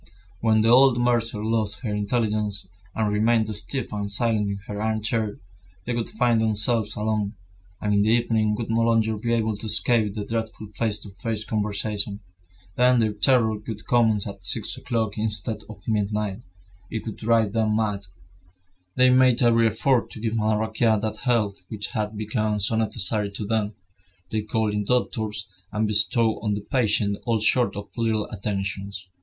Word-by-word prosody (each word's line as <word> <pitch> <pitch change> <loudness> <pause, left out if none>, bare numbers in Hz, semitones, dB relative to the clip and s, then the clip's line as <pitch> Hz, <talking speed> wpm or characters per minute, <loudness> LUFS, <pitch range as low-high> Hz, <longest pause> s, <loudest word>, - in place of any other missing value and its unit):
When 110 -1 +3
the 115 - +3
old 130 0 +6
mercer 115 -3 +1
lost 110 -1 0
her 110 -5 -3
intelligence, 105 -2 0 0.3
and 105 -2 0
remained 110 0 +2
stiff 110 +5 -3
and 100 -1 -3
silent 105 -1 +1
in 100 - -3
her 105 0 -5
armchair, 110 0 -1 0.5
they 120 - -2
would 115 -1 -2
find 120 -2 +2
themselves 110 0 +1
alone, 105 -1 -1 0.4
and 105 0 0
in 100 - +4
the 105 - +2
evening 110 -2 +2
would 110 0 -4
no 115 +1 +2
longer 115 -1 +2
be 115 +3 -2
able 110 -2 +1
to 110 - -6
escape 110 -1 +2
the 105 -2 -4
dreadful 110 -2 -4
face 105 0 -1
to 100 - -9
face 105 +3 -3
conversation. 105 -1 -1 0.6
Then 125 0 +5
their 110 -2 +2
terror 115 +1 +3
would 105 0 -7
commence 110 -4 +3
at 100 -2 -8
six 95 +4 +1
o'clock 115 -4 -2
instead 110 0 -1
of 105 -2 -12
midnight. 105 -2 -1 0.5
It 110 -2 -4
would 110 - -5
drive 110 -2 +2
them 110 -2 +1
mad. 105 -3 -1 0.9
They 130 0 +5
made 125 -1 +4
every 115 -1 +4
effort 115 +3 +1
to - - -8
give 110 0 -2
Madame 110 -1 +1
Raquin 110 0 +2
that 110 0 -3
health 110 -6 0
which 105 -2 -4
had 110 -3 -3
become 110 0 -1
so 105 +3 0
necessary 110 -2 0
to 105 - -4
them. 105 -1 -1 0.6
They 110 - 0
called 110 0 -1
in 105 0 -1
doctors, 110 -3 -1 0.2
and 110 +1 0
bestowed 110 +2 +2
on 105 -1 0
the 105 - -4
patient 105 -3 0
all 115 -2 +2
sorts 110 -1 +2
of 100 0 -7
little 110 -2 0
attentions. 100 -1 -4
110 Hz, 170 wpm, -24 LUFS, 105-115 Hz, 0.9 s, old